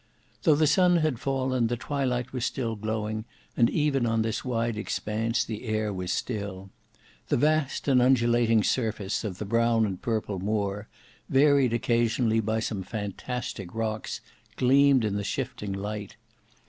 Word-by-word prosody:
Though 155 Hz, -, +5 dB
the 155 Hz, +1 st, +3 dB
sun 180 Hz, +4 st, +4 dB
had 155 Hz, -7 st, 0 dB
fallen, 130 Hz, -3 st, 0 dB
the 120 Hz, +1 st, -2 dB
twilight 125 Hz, -2 st, -2 dB
was 125 Hz, -2 st, -2 dB
still 115 Hz, -3 st, -2 dB
glowing, 110 Hz, 0 st, -3 dB, 0.3 s
and 115 Hz, -, +4 dB
even 140 Hz, -5 st, +1 dB
on 115 Hz, 0 st, +1 dB
this 110 Hz, 0 st, -2 dB
wide 115 Hz, -2 st, -1 dB
expanse 110 Hz, +2 st, -1 dB
the 110 Hz, +2 st, -6 dB
air 110 Hz, -2 st, -1 dB
was 90 Hz, -1 st, -3 dB
still. 100 Hz, -4 st, -4 dB, 0.6 s
The -, -, +1 dB
vast 150 Hz, +1 st, +1 dB
and 130 Hz, -3 st, +5 dB
undulating 120 Hz, -3 st, +3 dB
surface 110 Hz, -5 st, -1 dB
of 100 Hz, -5 st, -4 dB
the 105 Hz, -, -5 dB
brown 115 Hz, +1 st, +2 dB
and 95 Hz, -3 st, -4 dB
purple 110 Hz, -4 st, -2 dB
moor, 100 Hz, 0 st, -2 dB, 0.4 s
varied 140 Hz, -2 st, +4 dB
occasionally 115 Hz, -1 st, +1 dB
by 110 Hz, +1 st, 0 dB
some 105 Hz, -3 st, -3 dB
fantastic 105 Hz, 0 st, -5 dB
rocks, 110 Hz, -1 st, -3 dB, 0.3 s
gleamed 135 Hz, -1 st, +4 dB
in 100 Hz, -1 st, -1 dB
the 100 Hz, -, -2 dB
shifting 100 Hz, 0 st, -3 dB
light. 105 Hz, +1 st, -5 dB
115 Hz, 150 wpm, -27 LUFS, 105-125 Hz, 0.6 s, Though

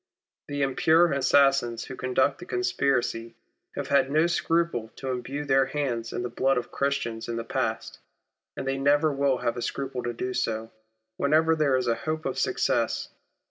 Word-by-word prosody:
The 145 Hz, 0 st, -1 dB
impure 160 Hz, +5 st, +3 dB
assassins 135 Hz, -3 st, +3 dB
who 130 Hz, -, -8 dB
conduct 130 Hz, +2 st, +1 dB
the 180 Hz, -, -9 dB
conspiracy 120 Hz, -2 st, 0 dB, 0.4 s
have -, -, -4 dB
had 140 Hz, -1 st, +3 dB
no 155 Hz, +3 st, +3 dB
scruple 165 Hz, -8 st, 0 dB
to 135 Hz, -1 st, -4 dB
imbrue 135 Hz, +4 st, -4 dB
their 135 Hz, -1 st, +3 dB
hands 120 Hz, -6 st, -2 dB
in -, -, -3 dB
the -, -, -1 dB
blood 135 Hz, +2 st, +1 dB
of 120 Hz, -, -3 dB
Christians 120 Hz, -5 st, -2 dB
in 115 Hz, -, -2 dB
the 115 Hz, -, -3 dB
past, 115 Hz, -, -3 dB, 0.6 s
and 135 Hz, -, -4 dB
they 135 Hz, 0 st, -1 dB
never 145 Hz, +2 st, +3 dB
will 140 Hz, -1 st, +1 dB
have 120 Hz, 0 st, -2 dB
a -, -, -3 dB
scruple 130 Hz, 0 st, -3 dB
to 120 Hz, 0 st, -3 dB
do 125 Hz, +2 st, -3 dB
so, 115 Hz, -3 st, -2 dB, 0.5 s
whenever 160 Hz, +3 st, +3 dB
there 150 Hz, -4 st, +2 dB
is 130 Hz, -, -1 dB
hope 155 Hz, +7 st, -2 dB
of 135 Hz, -, -2 dB
success. -, -, 0 dB
135 Hz, 175 wpm, -26 LUFS, 120-145 Hz, 0.6 s, impure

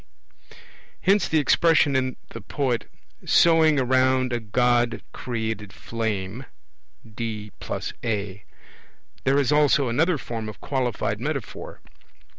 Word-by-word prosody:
Hence 195 Hz, +1 st, +3 dB
the 160 Hz, -, +1 dB
expression 155 Hz, -1 st, +4 dB
in 130 Hz, -1 st, 0 dB
the -, -, -8 dB
poet, 130 Hz, -5 st, -2 dB, 0.3 s
'sowing 160 Hz, -3 st, +5 dB
around 130 Hz, 0 st, +2 dB
a 120 Hz, -, 0 dB
god 120 Hz, +2 st, +1 dB
created 110 Hz, -4 st, -4 dB
flame' 110 Hz, +2 st, -4 dB, 0.6 s
(D 110 Hz, -2 st, -6 dB, 0.2 s
+ -, -, -7 dB
A). 100 Hz, -4 st, -3 dB, 0.8 s
There 135 Hz, +1 st, +3 dB
is 140 Hz, -1 st, +1 dB
also 145 Hz, -3 st, +3 dB
another 160 Hz, +8 st, +2 dB
form 115 Hz, -4 st, -5 dB
of 110 Hz, -, -11 dB
qualified 125 Hz, -6 st, -2 dB
metaphor. -, -, -5 dB
125 Hz, 110 wpm, -24 LUFS, 110-140 Hz, 0.8 s, sowing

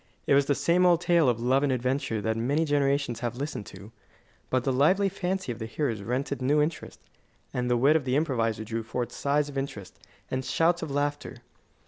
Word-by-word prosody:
It -, -, +3 dB
was 140 Hz, 0 st, +4 dB
the 145 Hz, -, +2 dB
same 175 Hz, +5 st, +2 dB
old 175 Hz, -2 st, +5 dB
tale 170 Hz, -5 st, +3 dB
of 120 Hz, -2 st, 0 dB
love 130 Hz, +3 st, +2 dB
and 145 Hz, -2 st, +1 dB
adventure 125 Hz, -3 st, -1 dB
that 110 Hz, +1 st, -1 dB
many 140 Hz, +8 st, 0 dB
generations 140 Hz, -4 st, 0 dB
have 120 Hz, -1 st, -3 dB
listened 140 Hz, -6 st, -5 dB
to; 100 Hz, +3 st, -12 dB, 0.6 s
but 130 Hz, -1 st, +1 dB
the 135 Hz, -, 0 dB
lively 185 Hz, +10 st, +3 dB
fancy 190 Hz, -3 st, -3 dB
of 115 Hz, -, -7 dB
the 110 Hz, -, -4 dB
hearers 115 Hz, -3 st, -2 dB
rent 125 Hz, +8 st, -2 dB
it 140 Hz, -2 st, -3 dB
new 145 Hz, +4 st, +2 dB
interest, 150 Hz, +2 st, -2 dB, 0.5 s
and 125 Hz, 0 st, -1 dB
the 120 Hz, -, +3 dB
wit 140 Hz, +6 st, +4 dB
of 160 Hz, -, +2 dB
the 130 Hz, 0 st, 0 dB
improviser 115 Hz, -8 st, 0 dB
drew 115 Hz, +1 st, -3 dB
forth 120 Hz, +2 st, -4 dB
sighs 145 Hz, +1 st, 0 dB
of 140 Hz, -2 st, -4 dB
interest 105 Hz, -9 st, -7 dB, 0.3 s
and 130 Hz, 0 st, -1 dB
shouts 165 Hz, +7 st, +1 dB
of -, -, -4 dB
laughter. 145 Hz, +1 st, -2 dB
135 Hz, 210 wpm, -27 LUFS, 120-150 Hz, 0.6 s, old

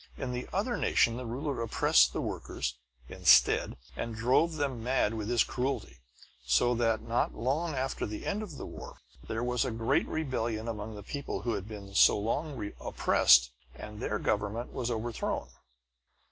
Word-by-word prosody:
In 130 Hz, -, -3 dB
the 125 Hz, 0 st, -5 dB
other 235 Hz, +5 st, -1 dB
nation, 115 Hz, -, +2 dB
the 125 Hz, 0 st, -5 dB
ruler 135 Hz, +2 st, -3 dB
oppressed 65 Hz, -, +4 dB
the -, -, -3 dB
workers, -, -, -4 dB, 0.3 s
instead, -, -, +4 dB, 0.2 s
and 115 Hz, -1 st, -4 dB
drove 130 Hz, +9 st, +2 dB
them 135 Hz, -6 st, -2 dB
mad 125 Hz, -3 st, +1 dB
with 110 Hz, -1 st, -4 dB
his 120 Hz, -1 st, +4 dB
cruelty. 130 Hz, -, -3 dB, 0.4 s
So 65 Hz, -, +3 dB
that, 115 Hz, -2 st, +1 dB
not 115 Hz, +1 st, 0 dB
long 145 Hz, +8 st, -1 dB
after 130 Hz, 0 st, -2 dB
the 105 Hz, 0 st, -6 dB
end 205 Hz, +2 st, -1 dB
of 180 Hz, -10 st, -7 dB
the -, -, -6 dB
war, -, -, -9 dB, 0.3 s
there 115 Hz, +2 st, -2 dB
was 125 Hz, 0 st, +1 dB
a 130 Hz, -, -1 dB
great 115 Hz, -1 st, +1 dB
rebellion 120 Hz, -7 st, -2 dB
among 110 Hz, -1 st, -5 dB
the 105 Hz, -, -9 dB
people 140 Hz, -5 st, -5 dB
who 120 Hz, -1 st, 0 dB
had 95 Hz, -, -4 dB
been 100 Hz, -3 st, -9 dB
so 100 Hz, -, +6 dB
long 115 Hz, +1 st, -2 dB
oppressed, 65 Hz, 0 st, +4 dB, 0.2 s
and 105 Hz, +7 st, -9 dB
their 105 Hz, -2 st, -1 dB
government 105 Hz, +3 st, -2 dB
was 125 Hz, -2 st, -2 dB
overthrown." 115 Hz, 0 st, -3 dB
115 Hz, 170 wpm, -30 LUFS, 105-130 Hz, 0.4 s, so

